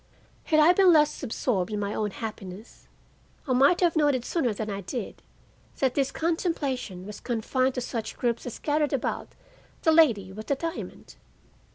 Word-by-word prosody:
Had 310 -2 +3
I 315 +4 +7
been 375 -1 +6
less 300 -2 +3
absorbed 220 -6 -1
in 210 - -2
my 200 0 -2
own 210 -1 -1
happiness 210 -1 -8 0.6
I 260 - +1
might 275 +9 +4
have 345 -2 +3
noted 290 -5 +2
sooner 290 -9 0
than 215 +1 -4
I 200 -1 -4
did 235 +6 -6 0.6
that 265 -2 +1
this 275 -2 0
contemplation 280 - -2
was 210 0 -8
confined 255 +2 -1
to 250 - -2
such 230 -2 -5
groups 240 0 -1
as 245 - -6
gathered 295 -1 0
about 270 - -2 0.6
the 320 - +5
lady 230 - +4
with 215 +2 -8
the 280 - +1
diamond. 330 +4 -6
255 Hz, 170 wpm, -27 LUFS, 215-305 Hz, 0.6 s, I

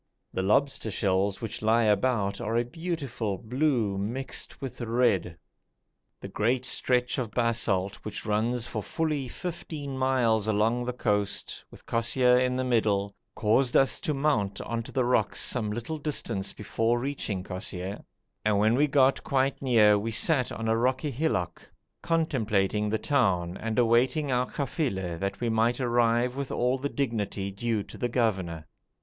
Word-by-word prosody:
The - - -1
lobster 110 +4 +1
shells 95 -1 0
which 115 - -5
lie 115 +2 +3
about 105 -1 +1
are 115 +2 -1
a 120 - +1
beautiful 135 - -3
blue 120 -4 0
mixed 120 +7 -3
with 130 -2 -7
red. 115 -7 +1 0.8
The - - -7
great 120 +4 0
stretch 125 0 0
of 120 -4 -2
basalt 105 -4 0
which 105 -1 -7
runs 115 +3 0
for 110 -2 -4
fully 150 +1 -2
fifteen 155 -3 -6
miles 125 -5 +2
along 110 +3 +1
the 125 - -1
coast, 105 -4 -1
with - - -16
Kosseir 125 +2 +3
in 125 0 +1
the 130 - 0
middle, 105 -5 +1 0.2
caused 120 +3 +2
us 135 - +2
to 150 - -2
mount 120 -9 0
on 115 0 -3
to 115 - -10
the 130 -2 +1
rocks 125 - +1
some 110 -4 0
little 120 +8 -4
distance 115 -9 -2
before 115 +3 0
reaching 120 -7 -3
Kosseir, 95 0 -5 0.4
and 105 -1 +2
when 110 +2 +3
we 145 +5 +3
got 135 -1 +3
quite 135 0 0
near 110 -6 +5
we 110 +3 -3
sat 125 +3 +2
on 115 - -4
a 110 - +3
rocky 130 +5 0
hillock, 110 - -1 0.4
contemplating 110 - 0
the 110 - +1
town 95 -11 +1
and 110 +2 -4
awaiting 125 +5 +3
our 125 0 +1
kafila, 100 - -2
that 100 0 -3
we 120 - -1
might 115 +3 +2
arrive 120 0 +2
with 140 -1 -4
all 125 +2 +1
the 140 +2 -2
dignity 105 -8 -2
due 110 +1 -1
to - - -12
the 120 - -1
governor. 95 -10 -1
115 Hz, 160 wpm, -27 LUFS, 105-130 Hz, 0.8 s, near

